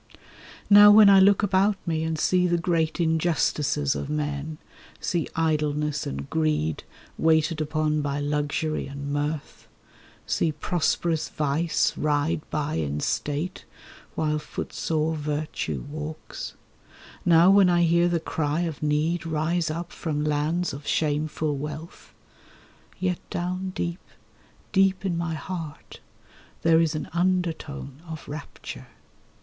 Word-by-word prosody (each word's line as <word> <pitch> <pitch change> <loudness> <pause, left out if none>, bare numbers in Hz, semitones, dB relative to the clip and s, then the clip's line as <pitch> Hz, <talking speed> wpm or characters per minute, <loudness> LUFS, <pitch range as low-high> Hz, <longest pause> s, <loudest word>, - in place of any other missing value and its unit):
Now 205 0 +9
when 205 -1 +8
I 195 - +8
look 200 +2 +5
about 200 +1 +3
me, 160 -2 -1
and 160 0 -1
see 180 +3 +2
the 175 0 +2
great 165 -2 0
injustices 160 -3 +1
of - - -4
men, 150 0 -3 0.4
See 170 -3 -1
Idleness 150 -2 0
and 70 +1 -5
Greed 80 -1 0 0.4
waited 160 0 +2
upon 155 0 0
by 145 0 -2
luxury 150 +2 -1
and 140 +1 -5
mirth, 145 +1 -3 0.6
See 160 - 0
prosperous 160 0 0
Vice 155 +3 0
ride 150 +2 0
by 150 - -2
in 75 -2 -2
state, 150 - -2 0.5
while 150 -1 0
footsore 155 +1 -2
Virtue 150 0 -3
walks; 155 +1 -7 0.7
Now 170 +2 +6
when 195 -2 +6
I 175 -1 +3
hear 170 +1 +4
the 170 -1 +1
cry 155 0 -1
of 165 -4 -3
need 150 +3 0
rise 160 +1 0
up 170 +2 -4
from 150 -3 -3
lands 150 +4 0
of 145 +1 -9
shameful 150 0 0
wealth— 150 +3 -7 0.9
Yet 180 -1 0
down 185 +2 -3
deep, 170 +1 -3 0.7
deep 195 -1 +2
in 180 -3 0
my 170 -1 -2
heart 160 -1 -7 0.6
there 165 0 +5
is 160 -1 +1
an 155 - -4
undertone 170 -6 -1
of 160 -2 -7
rapture. 145 +1 -8
155 Hz, 125 wpm, -25 LUFS, 150-170 Hz, 0.9 s, Now